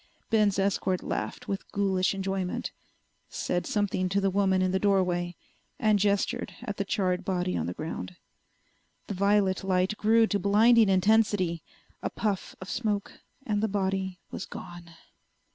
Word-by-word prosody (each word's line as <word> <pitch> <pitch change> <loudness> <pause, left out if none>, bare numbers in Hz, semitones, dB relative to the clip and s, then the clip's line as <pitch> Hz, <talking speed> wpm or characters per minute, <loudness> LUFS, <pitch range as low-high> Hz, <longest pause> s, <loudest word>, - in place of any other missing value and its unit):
Ben's 210 -3 +3
escort 195 -1 0
laughed 250 - -4
with 195 -2 -4
ghoulish 195 -1 +1
enjoyment, 190 -1 -2 0.6
said 175 -1 -2
something 195 -3 0
to 195 +2 +1
the 195 -1 +1
woman 190 -1 +2
in 185 - +1
the 190 - +1
doorway, 180 -3 +1 0.4
and 215 -2 +3
gestured 200 0 0
at 210 -5 -5
the 200 - 0
charred 190 -3 0
body 180 -1 -1
on - - -1
the 90 - -4
ground. 165 +3 -5 0.9
The - - -4
violet 200 0 +2
light 185 +1 +1
grew 225 +1 +4
to 205 -2 0
blinding 215 +3 +5
intensity. 195 -3 +2 0.4
A - - -2
puff 205 -4 -2
of 185 - -8
smoke 205 -2 -2 0.3
and 210 -3 0
the 220 - +2
body 190 -2 -1
was - - -5
gone. 175 -1 -9
195 Hz, 150 wpm, -28 LUFS, 185-205 Hz, 0.9 s, blinding